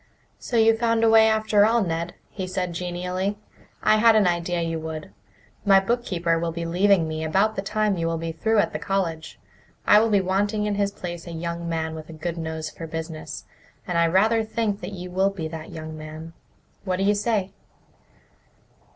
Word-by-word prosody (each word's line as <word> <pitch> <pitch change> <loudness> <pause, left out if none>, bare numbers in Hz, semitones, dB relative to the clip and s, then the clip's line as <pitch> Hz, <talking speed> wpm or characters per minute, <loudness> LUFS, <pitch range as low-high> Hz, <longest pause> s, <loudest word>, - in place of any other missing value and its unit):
"So 240 - -2
you 225 0 +5
found 230 0 +1
a 225 - +5
way 220 0 +7
after 220 -1 +3
all, 225 +1 +3
Ned," 170 -1 -3 0.2
he 190 -2 -5
said 180 -1 -2
genially. 180 +3 -3 0.5
"I 215 - +5
had 225 +1 +6
an 215 -2 +5
idea 175 0 0
you 165 -1 -2
would. 160 -1 -6 0.5
My 195 -1 +6
bookkeeper 190 -6 0
will 170 0 -1
be 170 +1 -4
leaving 180 0 +3
me 155 0 -3
about 195 +7 +2
the 195 - -1
time 210 0 0
you 165 0 -1
will 165 0 -1
be 165 0 -3
through 220 +7 0
at 205 - +2
the - - -3
college. 170 -5 -2 0.5
I 210 - +7
will 225 +1 +2
be 205 -2 +4
wanting 205 +3 0
in 210 - 0
his 200 0 0
place 175 -3 -7
a - - -6
young 170 +1 -4
man 160 -1 -2
with 155 0 -9
a - - -8
good 165 +2 -4
nose 160 -1 -4
for 165 +2 -8
business, 160 -1 -6 0.4
and 180 - -3
I 170 0 +4
rather 220 +6 +3
think 220 -2 -2
that - - -6
you 180 -1 -7
will 190 +2 +2
be 180 -5 -5
that 160 -1 -7
young 155 0 -7
man. 155 +1 -9 0.5
What 185 -2 -1
do 195 - 0
you 205 +1 +4
say?" 205 -2 -1
180 Hz, 205 wpm, -24 LUFS, 165-210 Hz, 0.5 s, way